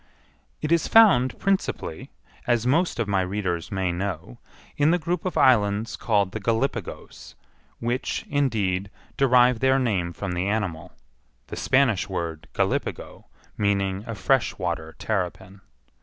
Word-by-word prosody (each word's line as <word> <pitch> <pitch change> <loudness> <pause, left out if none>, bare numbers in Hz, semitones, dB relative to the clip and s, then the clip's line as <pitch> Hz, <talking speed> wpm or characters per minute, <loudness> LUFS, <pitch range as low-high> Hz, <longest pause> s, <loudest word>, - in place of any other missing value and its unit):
It 150 - -1
is 170 -1 +3
found 190 - +5
principally, 195 - -2 0.4
as 120 -1 +1
most 165 +8 +1
of 115 -3 -1
my 100 -2 +1
readers 90 -2 -3
may 95 -2 -1
know, 90 -8 -5 0.4
in 145 +1 +3
the 175 - +3
group 175 +1 -3
of 185 - -2
islands 105 -3 +3
called 100 -4 +1
the 110 - -5
Gallipagos, 115 +6 -3 0.4
which, 120 +2 -2
indeed, 105 -9 0 0.3
derive 125 -3 +4
their 130 0 +3
name 100 -10 0
from 95 +2 -5
the 90 +2 -1
animal—the 80 - -6
Spanish 125 -7 +2
word 85 -4 -4
Gallipago - - -2 0.3
meaning 100 -1 0
a 115 - -4
fresh 125 +6 +1
water 85 -3 -4
terrapin. 95 -1 -4
105 Hz, 130 wpm, -24 LUFS, 95-130 Hz, 0.4 s, found